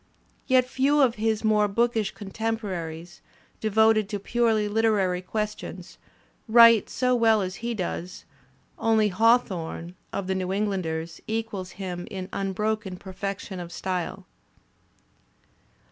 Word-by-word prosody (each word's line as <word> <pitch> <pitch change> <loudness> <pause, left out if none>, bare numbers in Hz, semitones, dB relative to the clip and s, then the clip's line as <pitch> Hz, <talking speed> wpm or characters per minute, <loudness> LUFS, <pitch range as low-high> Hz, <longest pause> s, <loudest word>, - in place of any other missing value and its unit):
Yet 255 -1 +4
few 275 +3 +2
of 260 -5 +4
his 220 -1 +1
more 210 -1 +3
bookish 225 0 +1
contemporaries, 190 -6 -4 0.4
devoted 220 -1 +3
to 210 - -2
purely 225 +1 +1
Uterary 205 -4 +1
questions, 210 +3 -5 0.5
write 230 -1 +7
so 250 -1 +1
well 225 -4 +4
as 185 0 -5
he 235 0 -2
does; 180 -2 -5 0.5
only 220 -2 +3
Haw 225 +5 +5
thorne, 170 -5 -6 0.2
of 200 - -3
the 190 - -1
New 185 -1 -2
Englanders, 175 -5 -2
equals 220 -4 -3
him 180 -2 -6
in 190 -1 -6
unbroken 200 0 -2
perfection 190 0 -6
of 175 -1 -7
style. 180 -1 -4
210 Hz, 120 wpm, -26 LUFS, 185-225 Hz, 0.5 s, write